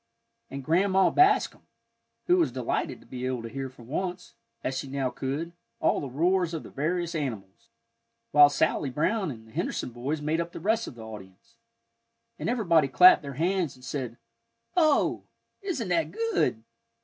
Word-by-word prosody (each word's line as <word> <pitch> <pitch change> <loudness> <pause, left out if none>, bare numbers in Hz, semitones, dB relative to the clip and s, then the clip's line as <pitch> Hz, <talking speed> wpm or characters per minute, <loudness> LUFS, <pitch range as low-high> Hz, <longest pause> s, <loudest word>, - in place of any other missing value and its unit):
And 140 0 -6
Grandma 190 +5 +3
Bascom, 385 +3 +3 0.6
who 360 +1 +4
was 340 - +2
delighted - - -2
to - - -19
be 125 -1 -7
able 125 -3 -3
to 115 - -6
hear 135 +1 -5
for 125 -2 -16
once, 180 +8 -4 0.3
as 130 - -2
she 135 - -4
now 135 -1 -2
could, 145 +6 -4 0.3
all - - +2
the 140 - -5
roars 170 +5 +1
of 160 - -5
the - - -11
various 170 +4 -1
animals, 115 - -5 0.6
while 145 0 +8
Sally 145 0 +1
Brown 185 - 0
and 110 -5 -8
the - - -17
Henderson 120 - -3
boys 130 +6 -3
made 155 +3 0
up 170 +1 -6
the - - -6
rest 220 +6 0
of - - -8
the 115 - -10
audience. 100 -4 -12 0.8
And - - -2
everybody 170 - +3
clapped 135 +8 +7
their 140 -2 -7
hands, 175 -1 0
and 125 0 -15
said, 125 -5 -4 0.6
"Oh, 310 -5 +2 0.4
isn't 310 - -3
that 165 -3 +1
good!" 165 - 0
150 Hz, 175 wpm, -27 LUFS, 130-185 Hz, 0.8 s, while